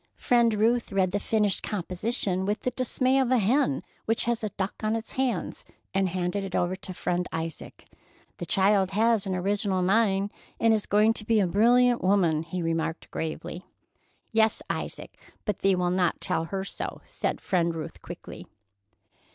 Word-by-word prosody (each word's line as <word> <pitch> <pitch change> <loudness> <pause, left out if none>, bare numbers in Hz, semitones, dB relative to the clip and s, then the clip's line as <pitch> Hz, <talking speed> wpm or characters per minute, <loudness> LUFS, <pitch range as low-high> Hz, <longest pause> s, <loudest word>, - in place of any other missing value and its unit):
Friend 235 -2 +3
Ruth 230 +3 +1
read 190 -2 +1
the 205 - 0
finished 210 -1 +1
composition 190 0 -1
with 205 +2 -1
the 250 - -1
dismay 255 +1 +1
of 260 -2 +1
a 255 - +4
hen 215 - +2 0.2
which 225 +1 +2
has 235 -1 -1
a 215 - -1
duck 195 0 -3
on 215 +1 +1
its 225 0 -5
hands, 260 -2 -2 0.3
and 195 -1 +1
handed 180 +2 -2
it 190 -2 -5
over 175 +1 +1
to 185 - -8
Friend 180 0 -1
Isaac. 160 -1 -6 0.5
"The 175 - -5
child 195 +1 +3
has 220 -1 +2
an 190 - -1
original 195 0 0
mind, 200 0 +2 0.3
and 225 -1 +4
is 215 -2 -1
going 210 +2 +4
to 225 - -5
be 220 0 +2
a 200 - +3
brilliant 240 +6 +4
woman," 180 -5 +3
he 170 +2 -4
remarked 165 0 -2
gravely. 160 +2 -5 0.7
"Yes, 220 -1 +2
Isaac, - - -5 0.3
but 210 -4 -2
thee 195 -1 +3
will 180 -1 0
not 180 -1 +1
tell 165 - -1
her 190 +3 -3
so," - - -5
said - - -3
Friend 170 -2 +1
Ruth 160 - -7
quickly. - - -9
195 Hz, 175 wpm, -27 LUFS, 180-225 Hz, 0.7 s, a